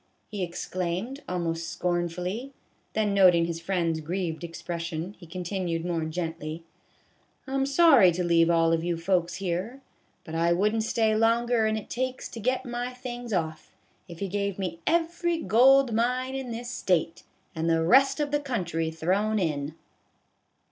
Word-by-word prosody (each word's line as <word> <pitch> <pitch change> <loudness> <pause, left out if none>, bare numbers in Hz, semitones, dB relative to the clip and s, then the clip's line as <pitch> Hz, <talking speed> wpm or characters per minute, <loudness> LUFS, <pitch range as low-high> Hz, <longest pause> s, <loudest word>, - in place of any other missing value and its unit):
" - - -43
he 205 -2 -4
exclaimed, 180 - -3
almost 165 -2 -2
scornfully; 180 +8 -2 0.4
then 210 -2 +1
noting 180 -4 +5
his 165 0 -4
friend's 165 -3 0
grieved 170 +1 -3
expression, 170 +1 -5
he 170 - -12
continued 175 -1 -3
more 170 -2 -1
gently: 160 -1 -4 0.4
" - - -40
I 265 - -5
'm 270 0 +1
sorry 275 - +6
to 180 +2 -1
leave 170 -1 +4
all 165 -1 +3
of 165 0 0
you 175 -1 -1
folks 170 0 0
here, 190 +7 -3 0.4
but 160 - -9
I 170 +1 +2
wouldn't 210 +5 +1
stay 220 -1 +2
longer 230 0 +2
'n 220 0 0
it 215 - -7
takes 255 +1 -3
to 230 - -8
get 255 +4 0
my 245 +1 -4
things 245 -2 -7
off, 160 -5 -3 0.3
if 170 +2 -7
you - - -1
gave 200 0 -2
me 185 -3 -4
every 340 +1 +1
gold 260 +1 +5
mine 250 +3 0
in 265 -2 -4
this 240 +1 -5
State, 170 -8 0 0.3
and 165 -1 -1
the 165 0 +2
rest 270 - +5
of 290 -1 -1
the 290 - +2
country 175 - -2
thrown 190 +7 0
in 150 -5 -2
185 Hz, 165 wpm, -27 LUFS, 170-240 Hz, 0.4 s, sorry